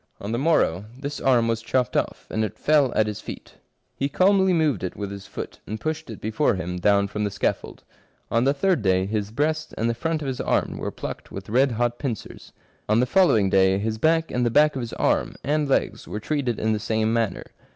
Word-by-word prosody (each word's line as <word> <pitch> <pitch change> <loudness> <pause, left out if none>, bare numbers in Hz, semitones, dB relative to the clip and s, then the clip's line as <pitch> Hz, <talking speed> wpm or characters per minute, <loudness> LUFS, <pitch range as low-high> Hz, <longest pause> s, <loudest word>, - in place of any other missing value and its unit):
On 100 - -5
the 115 - -1
morrow 130 - +2
this 140 +1 -5
arm 120 -3 +3
was 115 -1 0
chopped 125 +1 0
off, - - -1
and 110 - 0
it 105 - -4
fell 145 -4 +3
at 110 - +3
his 105 0 -5
feet. - - -9 0.4
He 140 - -1
calmly 190 +4 +4
moved 155 - +1
it 90 - -3
with 100 -1 -5
his 100 -1 -8
foot, - - -7
and 110 +2 -4
pushed 155 +2 -3
it 110 - -7
before 110 +3 +1
him 90 -1 -4
down 100 +1 +3
from 105 +1 -3
the 105 - 0
scaffold. 100 0 -3 0.5
On 115 +1 +3
the 135 - +4
third 180 -1 +2
day 95 -2 +2
his 105 0 -2
breast 155 +6 -1
and 115 - 0
the 115 - +1
front 160 +5 -2
of - - -4
his 130 -2 -3
arm - - 0
were - - -3
plucked - - -7
with 95 +1 -8
red 130 +3 +3
hot 120 +1 -1
pincers; 125 -7 -6 0.4
on 110 +2 +4
the 125 - +3
following 125 - +4
day 95 0 +4
his 110 +2 -2
back 160 +4 +2
and 125 - 0
the 120 - +2
back 150 +5 +4
of 130 - -2
his 120 - -6
arm, - - 0
and 150 0 0
legs, - - 0
were 105 - -4
treated 130 -1 -1
in 110 0 +1
the 105 - -1
same 110 +1 0
manner. 115 -5 0
115 Hz, 230 wpm, -24 LUFS, 105-145 Hz, 0.5 s, calmly